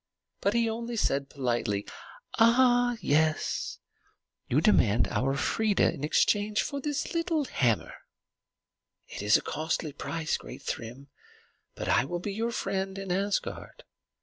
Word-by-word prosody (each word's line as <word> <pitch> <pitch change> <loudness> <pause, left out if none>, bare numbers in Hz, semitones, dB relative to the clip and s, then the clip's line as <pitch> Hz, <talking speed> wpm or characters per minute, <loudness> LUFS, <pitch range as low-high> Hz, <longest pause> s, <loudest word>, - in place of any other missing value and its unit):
But - - 0
he 235 -1 +3
only 235 +1 -3
said 140 -10 0
politely, 120 -7 -1 0.5
"Ah, 245 +1 +4
yes; 155 +2 0 0.7
you 130 - +3
demand 120 - +4
our 135 +2 0
Freia 210 +8 +2
in 140 - -8
exchange 205 +7 +2
for 280 -1 -4
the 295 - -2 0.2
little 330 -3 0
hammer? 120 - 0 1.1
It - - -7
is 105 +1 +5
a - - -7
costly 155 -1 -2
price, 160 +2 -2
great - - -11
Thrym. 125 +5 -6 0.7
But - - -5
I - - +3
will 175 +5 -3
be 200 +3 -4
your 225 +3 -1
friend 195 -3 -2
in 195 -2 -5
Asgard. 200 +2 -2
190 Hz, 135 wpm, -28 LUFS, 140-230 Hz, 1.1 s, is